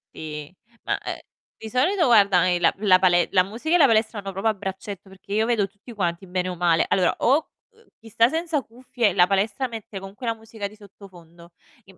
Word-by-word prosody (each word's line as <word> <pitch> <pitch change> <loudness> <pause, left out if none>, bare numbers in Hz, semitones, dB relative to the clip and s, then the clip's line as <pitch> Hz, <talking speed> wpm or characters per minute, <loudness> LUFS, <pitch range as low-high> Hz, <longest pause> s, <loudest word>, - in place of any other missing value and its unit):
Sì, 150 +1 -7 0.3
ma, - - -1
ehm, - - -6 0.4
di 220 - -9
solito 335 - +2
guarda, 200 -7 +4
ehm, 175 -1 +1
la - - +4
la 190 -3 +5
pale 175 -2 +3
la 185 -2 +4
musica 235 - -2
e - - +6
la 310 - +6
palestra 220 -2 +1
vanno 195 -1 -6
proprio 195 +4 -2
a 220 - +3
braccetto, 195 0 -7
perché 195 +1 -10
io 220 +1 +2
vedo 225 -4 +1
tutti 205 +5 -15
quanti 175 -3 -2
bene 180 0 -2
o 180 - -5
male 170 -2 +2
allora 185 -2 +2
o, 285 +6 +2 0.2
uhm, 455 +1 -26
chi 225 - -14
sta 230 +2 +3
senza 325 -1 -1
cuffie 240 -3 -2
la 180 0 +4
palestra 200 +6 0
mette 225 -4 -8
comunque 195 +5 -10
la 230 - 0
musica 220 -2 -7
di 205 - -15
sottofondo. 175 -5 -16 0.3
Im 190 -1 -19
200 Hz, 215 wpm, -23 LUFS, 185-230 Hz, 0.4 s, e